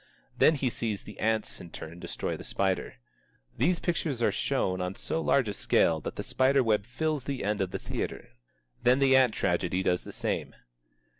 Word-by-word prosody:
Then 160 - +5
he 130 -3 0
sees 110 -4 -3
the 105 - -11
ants 110 -1 0
in 85 - -10
turn 85 +1 -9
destroy - - -4
the - - -9
spider. 95 -1 -1 0.6
These 180 0 +3
pictures 165 -7 -1
are 120 - +3
shown 95 0 0
on 90 +1 -3
so 165 - -2
large 135 -6 +3
a 105 - -2
scale 80 -4 +2
that - - -5
the - - -4
spiderweb 130 -6 +2
fills 150 +2 -2
the 140 -2 -3
end 105 0 0
of 95 - 0
the - - -3
theatre. - - -5 0.5
Then 125 +1 +5
the 135 -1 +5
ant 130 -4 +5
tragedy 90 +1 0
does 90 -1 +1
the - - -8
same. - - -3
110 Hz, 190 wpm, -29 LUFS, 95-135 Hz, 0.6 s, Then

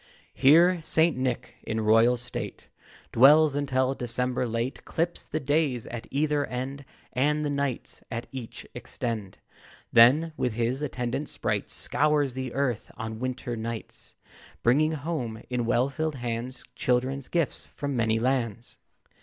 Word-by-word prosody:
Here 170 +5 +5
St. 160 +1 +3
Nick, 125 -1 -3
in 110 0 -3
royal 115 +3 +5
state, 120 +1 -7 0.4
Dwells, 145 +4 +6
until 130 -2 +1
December 125 0 -1
late 115 +3 -3
Clips 170 +1 -2
the 155 - -3
days 145 -4 +1
at 120 -1 -7
either 145 +1 +1
end, 135 +3 -5 0.3
And 150 +4 +1
the 145 - -1
nights 140 -3 -2
at 115 +1 -4
each 130 -4 -7
extend; 110 -5 -4 0.6
Then, 140 +8 +6
with 125 - 0
his 120 +4 -1
attendant 130 0 -3
sprites, - - -2
Scours 145 -3 +1
the 130 -1 -4
earth 130 -5 -1
on 110 -1 -5
wintry 125 -1 -3
nights, 115 0 -6 0.5
Bringing 150 +6 +4
home, 140 -8 -4
in 120 -2 -1
well 120 +2 +3
filled 155 +2 -2
hands, 120 0 -4
Children's 130 +2 0
gifts 170 -4 -1
from 140 -1 -4
many 110 -2 +2
lands. 120 -2 -1
130 Hz, 135 wpm, -27 LUFS, 120-145 Hz, 0.6 s, Dwells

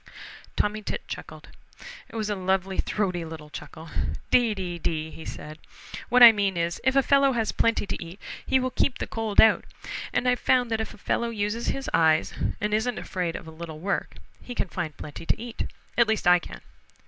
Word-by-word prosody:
Tommy 210 +1 0
Tit - - -5
chuckled. - - -8 0.6
It - - -13
was 215 -2 -1
a 210 - 0
lovely 190 0 0
throaty 180 -5 0
little 160 -2 -9
chuckle. 160 +2 -9 0.4
"Dee, 235 -4 +4
dee, 180 -3 -4
dee!" 160 0 -3
said 155 +1 -8 0.3
he. - - -5
"What 250 0 +7
I 235 - +13
mean 200 -4 0
is, 170 0 -1
if 260 +1 +2
a 275 - +5
fellow 275 0 +4
has 225 -2 0
plenty 230 -2 +1
to 195 - -4
eat 170 +4 -10 0.2
he 265 - +2
will 255 0 -1
keep 260 - +1
the - - -3
cold 220 -2 -2
out, 220 - +7 0.5
and 250 - 0
I've 250 0 +3
found 245 -2 +2
that 225 0 +1
if 220 - -5
a - - -17
fellow 235 +3 -1
uses 215 +1 -2
his 270 0 -2
eyes 160 -1 +3 0.3
and 210 0 -1
isn't 220 +2 +1
afraid 175 -3 -3
of 190 - -7
a - - -8
little 160 -1 -8
work, 195 +5 -2 0.3
he 245 - -8
can 190 - -1
find 165 -5 -4
plenty 150 +2 -8
to - - +1
eat. 235 0 -5 0.3
At 235 -2 +4
least 220 -3 0
I 180 0 +7
can. - - -10
205 Hz, 205 wpm, -26 LUFS, 170-230 Hz, 0.6 s, I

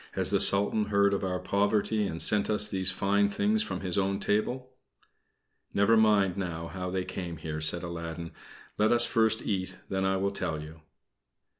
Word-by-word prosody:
"Has - - 0
the - - +2
Sultan 100 +2 +5
heard 100 -1 +2
of 100 - -2
our 90 -1 -2
poverty 100 +3 0
and 80 -2 -6
sent 105 +3 +1
us 105 -1 +2
these 95 -2 -1
fine 100 +2 +1
things 210 - 0
from 210 - -4
his 95 0 -1
own 100 0 -1
table?" 125 +6 -2 1.0
"Never 100 +3 +4
mind 105 -4 +3
now 85 -3 -5
how 90 -1 -5
they 95 0 -3
came 90 -2 -6
here," 75 -1 -6
said 80 +3 +1
Aladdin. 85 -1 -6 0.5
"Let 105 +1 +3
us 120 0 +7
first 110 -1 +1
eat, 95 -3 -3
then 95 0 -2
I 95 0 +1
will 100 +1 -1
tell 80 -5 -3
you." 80 +1 -11
100 Hz, 180 wpm, -28 LUFS, 90-105 Hz, 1.0 s, us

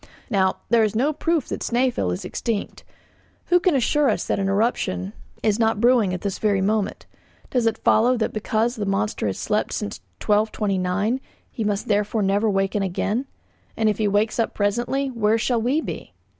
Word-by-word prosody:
Now, 190 -2 +2
there 235 -1 +4
is 215 0 0
no 275 +7 +2
proof 325 -1 0
that - - -4
Snæfell 240 - 0
is 90 - -4
extinct. 225 -4 -3 0.7
Who 355 - +5
can 355 -3 +2
assure 280 +2 +2
us 215 - -1
that - - -1
an 195 0 0
eruption 195 - 0 0.3
is 215 0 +2
not 225 -2 +2
brewing 235 -4 +4
at 180 - -3
this 200 -2 -3
very 205 -2 +2
moment? 205 +1 -1 0.5
Does 245 -3 +2
it 225 -1 0
follow 245 +3 +3
that 225 - -1
because 220 +3 0
the 205 -2 -2
monster 195 - -1
has 95 - -2
slept - - -1
since 100 - -4 0.2
1229 210 +1 0 0.3
he 225 - -3
must 205 -1 -1
therefore 210 +1 +1
never 200 +3 +2
awake 195 -1 +1
again? 205 +5 -1 0.5
And 220 -1 +3
if 210 - -1
he 215 - +2
wakes 210 +3 +1
up 230 - 0
presently, 240 +7 0
where 225 -2 +2
shall 230 0 0
we 265 +7 +1
be? - - -7
215 Hz, 185 wpm, -23 LUFS, 200-240 Hz, 0.7 s, Who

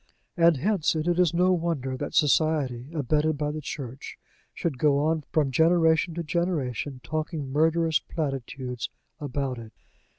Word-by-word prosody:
And 170 -3 +5
hence 185 +1 +1
it 155 +1 -1
is 175 -1 +3
no 180 +2 +3
wonder 160 -7 -1
that - - -5
Society, 145 -5 +2
abetted 155 0 0
by 150 0 -1
the 155 +1 -5
Church, 135 -3 -7 0.3
should 150 -7 -3
go 145 -1 +4
on 155 +1 0
from 145 -4 +1
generation 160 +2 +3
to 170 - -3
generation 150 -6 -2
talking 155 -3 -3
murderous 160 +2 +2
platitudes 135 -5 -4 0.3
about 135 -3 -3
it. 110 -1 -11
155 Hz, 140 wpm, -26 LUFS, 135-165 Hz, 0.3 s, And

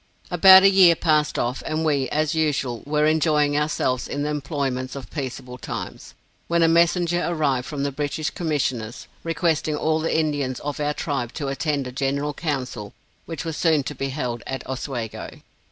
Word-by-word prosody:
About 190 +2 +8
a 195 - +8
year 185 -3 +7
passed 155 -2 +1
off, 120 +2 -1
and 155 +1 -2
we, 140 -4 +1
as 155 +1 0
usual, 140 -7 0
were 150 0 +2
enjoying 150 -2 +2
ourselves 145 -4 0
in 145 - -3
the 150 - -1
employments 135 -3 -3
of 135 -2 -8
peaceable 130 -3 -6
times, - - -7 0.3
when 170 0 +2
a - - +5
messenger 170 +1 +3
arrived 145 -7 0
from 145 -2 -4
the 140 - -1
British 150 +2 -2
Commissioners, 130 -9 -2 0.2
requesting 165 -2 0
all 155 +1 +1
the 160 0 0
Indians 145 -5 -1
of 145 0 -4
our 150 0 -1
tribe 135 -6 -3
to 140 -4 -3
attend 140 0 -1
a 125 - -6
general 140 +2 -1
council 125 - -4 0.3
which 165 -1 -5
was 165 -2 -3
soon 160 -4 +2
to 150 - -5
be 135 0 -3
held 125 -4 -3
at 135 - -5
Oswego. 125 -4 -5
150 Hz, 175 wpm, -23 LUFS, 135-160 Hz, 0.3 s, About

